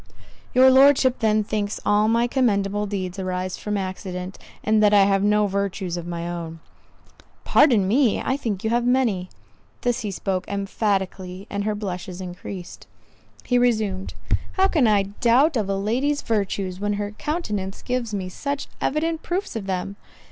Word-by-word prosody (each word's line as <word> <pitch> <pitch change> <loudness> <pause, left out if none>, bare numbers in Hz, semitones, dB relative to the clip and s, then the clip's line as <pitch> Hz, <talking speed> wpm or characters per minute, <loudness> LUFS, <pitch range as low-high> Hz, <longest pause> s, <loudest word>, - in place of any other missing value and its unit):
"Your 260 +1 +7
Lordship 265 -1 +5
then 215 -1 +2
thinks 205 0 -2
all 210 +1 +3
my 230 +1 +3
commendable 210 -5 +1
deeds 190 -2 -4
arise 185 0 -2
from 210 -1 -2
accident, 185 -1 -5 0.2
and 215 0 +3
that 210 -1 +5
I 200 - +7
have 195 0 +3
no 210 +1 +3
virtues 195 -2 -2
of 175 -1 -6
my 170 0 -4
own." 165 -1 -5 0.8
"Pardon 235 -10 +4
me, 240 +2 +3
I 265 - 0
think 220 -9 -3
you 220 - 0
have 240 0 +2
many." 240 -8 +1 0.5
This 245 -1 0
he 215 -4 -3
spoke 190 -1 -2
emphatically; 195 -2 -2
and 200 0 -2
her 215 -1 0
blushes 185 -2 -5
increased. 180 0 -8 0.6
He 245 -1 +2
resumed—"How 220 - 0
can 305 -10 +3
I 205 -2 +4
doubt 240 +9 +2
of 210 -4 0
a 195 - +1
lady's 255 +9 0
virtues, 195 -4 -1
when 205 +1 -1
her 205 0 -3
countenance 210 - -4
gives 245 -3 -2
me 195 -3 -3
such 280 +9 -4
evident 320 +3 0
proofs 370 -2 -3
of 205 -3 -4
them? 190 +1 -3
205 Hz, 160 wpm, -23 LUFS, 190-240 Hz, 0.8 s, Your